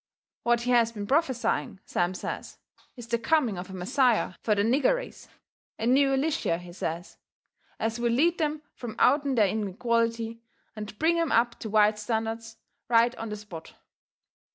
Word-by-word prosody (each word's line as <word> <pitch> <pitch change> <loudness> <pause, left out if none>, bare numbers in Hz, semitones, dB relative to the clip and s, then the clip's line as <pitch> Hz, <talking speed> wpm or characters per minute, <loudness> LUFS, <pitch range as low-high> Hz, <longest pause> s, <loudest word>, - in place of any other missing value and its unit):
What 235 0 +2
he 250 +1 -1
has 235 -2 +4
been 205 -3 -5
prophesying, 240 - 0
Sam 175 +1 -1
says, - - -6 0.4
is 240 -3 -9
the 235 0 +1
coming 240 - +1
of 180 +2 -7
a - - -8
Messiah 235 +3 +1
fur 215 - +2
the 200 - +2
nigger 275 - +3
race - - -8 0.5
a 225 - -3
new 270 +3 +4
Elishyah, 270 - 0
he 175 0 -11
says, 170 -1 -5 0.6
as 225 +1 -1
will 235 0 +1
lead 330 +9 +2
them 305 -1 -1
from 235 -3 -7
out'n 280 -2 +3
their 215 -4 +4
inequality 230 +3 -1 0.3
and 210 -1 -7
bring 335 +4 +2
'em 330 -3 0
up 235 +1 +2
to 220 - -5
white 210 0 +4
standards 225 +1 -3 0.3
right 235 +1 +4
on 225 - -5
the 210 - -4
spot. 185 -6 -10
230 Hz, 170 wpm, -27 LUFS, 210-255 Hz, 0.6 s, has